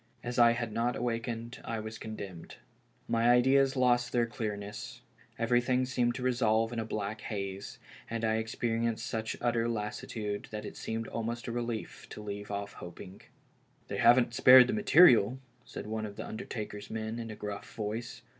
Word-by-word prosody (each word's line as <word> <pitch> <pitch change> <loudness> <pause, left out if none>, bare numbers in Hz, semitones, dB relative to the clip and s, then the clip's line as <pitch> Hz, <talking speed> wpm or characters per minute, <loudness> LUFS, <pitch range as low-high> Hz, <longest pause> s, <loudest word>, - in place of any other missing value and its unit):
As 120 0 -2
I 120 0 +7
had 115 -2 -3
not 120 +2 0
awakened 115 0 -3
I 115 - -3
was 110 +1 -7
condemned. 100 -6 -8 0.5
My 115 +1 +2
ideas 130 +3 +4
lost 125 -1 +3
their 120 -1 +2
clearness, 105 +1 -5 0.4
everything 120 +2 +2
seemed 120 -1 0
to 125 - -5
revolve 115 -2 +2
in 115 - -2
a 110 - -2
black 105 0 -4
haze, 100 -2 -5 0.3
and 115 0 -2
I 110 0 +2
experienced 115 0 -1
such 110 0 -3
utter 120 -1 +1
lassitude 105 -1 -4
that 105 -2 -6
it - - -7
seemed 115 0 -4
almost 115 +1 -4
a 120 - -3
relief 120 -1 -4
to 105 - -8
leave 100 0 -6
off 100 0 -4
hoping. 90 +2 -10 0.3
" - - -37
They - - -3
haven't 120 -1 +5
spared 125 +1 +9
the - - -2
material," 160 - +6 0.3
said - - -7
one 110 0 -3
of 100 - -10
the - - -6
undertaker's 105 -2 -6
men, 110 +1 -4
in 115 -1 -5
a 110 - -6
gruff 105 -1 -6
voice. 115 +2 -4
115 Hz, 175 wpm, -31 LUFS, 105-120 Hz, 0.5 s, spared